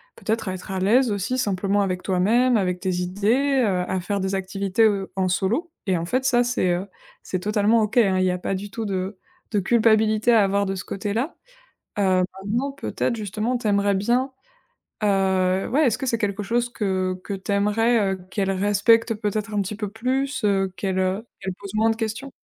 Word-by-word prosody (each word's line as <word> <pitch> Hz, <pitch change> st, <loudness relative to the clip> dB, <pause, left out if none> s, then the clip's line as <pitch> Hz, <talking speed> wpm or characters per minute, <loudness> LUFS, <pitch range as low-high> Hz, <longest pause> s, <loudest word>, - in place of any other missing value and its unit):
peut-être 220 Hz, -2 st, -2 dB
à -, -, -2 dB
être 185 Hz, +2 st, -9 dB
à 190 Hz, -, -3 dB
l'aise 230 Hz, +5 st, +3 dB
aussi 205 Hz, +6 st, -1 dB
simplement 200 Hz, -1 st, +1 dB
avec 185 Hz, -2 st, -2 dB
toi-même, 225 Hz, +6 st, +3 dB
avec 180 Hz, -2 st, -1 dB
tes 185 Hz, 0 st, -1 dB
idées, 240 Hz, +9 st, +1 dB
heu, 180 Hz, -3 st, +1 dB
à 190 Hz, -, 0 dB
faire 200 Hz, +2 st, -2 dB
des 190 Hz, +1 st, -1 dB
activités, 195 Hz, +2 st, 0 dB
heu, 200 Hz, -3 st, +1 dB
en 190 Hz, -1 st, +1 dB
solo 230 Hz, -, 0 dB, 0.2 s
et 185 Hz, -2 st, +2 dB
en 165 Hz, -, -3 dB
fait 255 Hz, +7 st, -1 dB
ça, 245 Hz, -2 st, +4 dB
c'est, 240 Hz, -7 st, 0 dB
heu, 180 Hz, +3 st, -2 dB, 0.4 s
c'est 185 Hz, -, -3 dB
totalement 210 Hz, +3 st, +2 dB
OK, 215 Hz, +3 st, -1 dB
hein, 195 Hz, -5 st, +4 dB
il 185 Hz, -, +2 dB
y -, -, +2 dB
a 180 Hz, -, -2 dB
pas 190 Hz, -, -3 dB
du 200 Hz, +2 st, -4 dB
tout 225 Hz, +2 st, -5 dB
de 190 Hz, 0 st, -3 dB, 0.3 s
de 210 Hz, -, +1 dB
culpabilité 220 Hz, +1 st, +3 dB
à 220 Hz, -3 st, +5 dB
avoir 200 Hz, +1 st, +1 dB
de 195 Hz, 0 st, -2 dB
ce 185 Hz, -, -6 dB
côté-là, 220 Hz, -, -3 dB, 0.6 s
heu, 185 Hz, -2 st, +3 dB, 0.2 s
maintenant 240 Hz, +7 st, -1 dB
peut-être 255 Hz, -3 st, -2 dB
justement 215 Hz, +4 st, -2 dB
tu 235 Hz, -, -4 dB
aimerais 200 Hz, -1 st, +2 dB
bien, 245 Hz, +7 st, +1 dB, 0.7 s
heu, 190 Hz, -2 st, +2 dB
ouais, 295 Hz, +5 st, +2 dB
est-ce 225 Hz, -2 st, +1 dB
que 265 Hz, -, -3 dB
c'est 235 Hz, -, +1 dB
quelque 205 Hz, -2 st, -2 dB
chose 240 Hz, +3 st, 0 dB
que 185 Hz, -4 st, -1 dB
que 200 Hz, -, -4 dB
tu 195 Hz, +1 st, -4 dB
aimerais, 210 Hz, 0 st, +2 dB
heu, -, -, -6 dB
qu'elles 195 Hz, -2 st, -1 dB
respectent 205 Hz, +4 st, +3 dB
peut-être 210 Hz, +1 st, -3 dB
un 205 Hz, -, +1 dB
petit 200 Hz, +3 st, -5 dB
peu 210 Hz, -1 st, -3 dB
plus, 260 Hz, +5 st, -2 dB
heu, 195 Hz, -2 st, +1 dB
qu'elles, 190 Hz, 0 st, -2 dB
heu, 190 Hz, +5 st, -1 dB
qu'elles 190 Hz, -, -3 dB
posent 200 Hz, 0 st, -8 dB
moins 220 Hz, +1 st, +3 dB
de 225 Hz, -, -1 dB
questions? 230 Hz, +5 st, -4 dB
205 Hz, 210 wpm, -23 LUFS, 190-230 Hz, 0.7 s, à